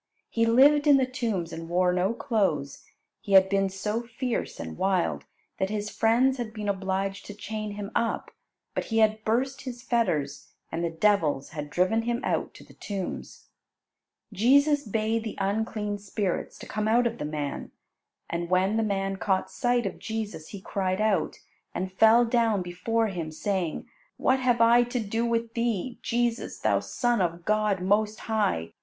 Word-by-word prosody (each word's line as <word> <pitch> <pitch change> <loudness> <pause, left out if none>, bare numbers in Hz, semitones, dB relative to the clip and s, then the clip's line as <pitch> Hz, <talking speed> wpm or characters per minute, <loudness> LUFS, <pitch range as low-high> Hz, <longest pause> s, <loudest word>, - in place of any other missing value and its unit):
He 230 0 +2
lived 285 +6 +5
in 285 -2 +7
the 265 - +3
tombs 225 - -3
and 165 0 -7
wore 180 +1 +2
no 180 +3 +1
clothes. 190 - -1 0.3
He 200 -3 -4
had 190 0 +7
been 195 0 +2
so 210 +4 -2
fierce 240 +1 -4
and 80 -1 -6
wild 190 -2 0 0.3
that 190 0 0
his 210 0 -3
friends 250 +4 +2
had 225 -2 -5
been 210 -1 -4
obliged 195 0 -2
to 205 - -8
chain 215 0 -5
him 205 0 -6
up, 230 - -1 0.4
but - - -2
he 225 - -2
had 215 0 +3
burst 260 +5 0
his 245 -2 -7
fetters, 155 - -1 0.2
and 165 +1 -2
the 170 - 0
devils 165 -5 +1
had 150 -1 -6
driven 185 +8 +2
him 240 +1 -1
out - - -1
to - - -12
the - - -17
tombs. 195 -3 -6 0.8
Jesus 280 +7 +4
bade 220 +1 0
the 220 - -6
unclean 205 +1 -1
spirits 200 -1 -3
to - - -10
come 215 0 -2
out 240 +3 +3
of 235 0 -2
the - - -3
man. 150 -1 -4 0.6
And 170 0 -3
when 190 +4 +2
the - - +2
man 195 -2 -1
caught 190 -1 0
sight 245 -1 +1
of 195 - -4
Jesus, 215 -8 -5
he 200 - -9
cried 185 0 -1
out, 215 -2 +1 0.4
and 185 +1 -3
fell 225 +4 +6
down 230 -4 +2
before 225 +6 -1
Him, 170 -4 -4
saying, 180 0 -2 0.3
"What 260 0 +2
have 245 -2 +2
I 235 +1 +6
to 245 +1 -1
do 225 +2 -1
with 230 0 -1
Thee, 235 0 -2
Jesus, 240 0 -1
Thou - - +2
Son 240 -4 0
of 170 -1 -2
God 210 -3 +1
most 210 +3 +1
high? 205 - -1
210 Hz, 175 wpm, -27 LUFS, 190-230 Hz, 0.8 s, in